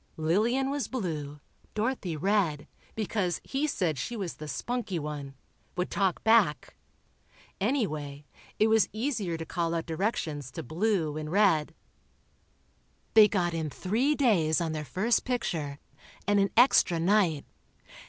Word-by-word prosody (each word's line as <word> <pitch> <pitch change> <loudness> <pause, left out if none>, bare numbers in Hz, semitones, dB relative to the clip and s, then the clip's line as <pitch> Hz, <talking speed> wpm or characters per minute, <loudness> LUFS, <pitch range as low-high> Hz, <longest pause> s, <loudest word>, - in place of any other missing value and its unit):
Lillian 225 - +1
was 285 -1 -2
"blue," 150 - -4 0.3
Dorothy 215 -7 -1
"red," 180 -4 +1 0.3
because 200 -5 -1
he 280 +3 -1
said 170 - -1
she 240 - -4
was 190 -5 -4
the 155 - -7
spunky 235 +1 -3
one... 145 -3 -5 0.4
would 180 - -1
talk 190 -3 0
back. 220 -9 +3 0.8
Anyway, 155 - -2 0.3
it 215 - +4
was 220 -1 +3
easier 215 - -2
to 165 - -6
call 170 0 -1
out 165 - -2
directions 160 - -2
to - - -5
"Blue" 165 - 0
and 155 0 -5
"Red." 165 -6 +3 1.4
They 215 -1 +8
got 175 -5 0
in 160 -2 -2
three 235 - 0
days 180 - +3
on 165 -2 -1
their 155 -1 -4
first 215 - +1
picture, 165 - -2 0.5
and 205 0 +4
an 195 0 +2
extra 230 -8 +5
night. 175 -4 +2
180 Hz, 135 wpm, -28 LUFS, 155-220 Hz, 1.4 s, They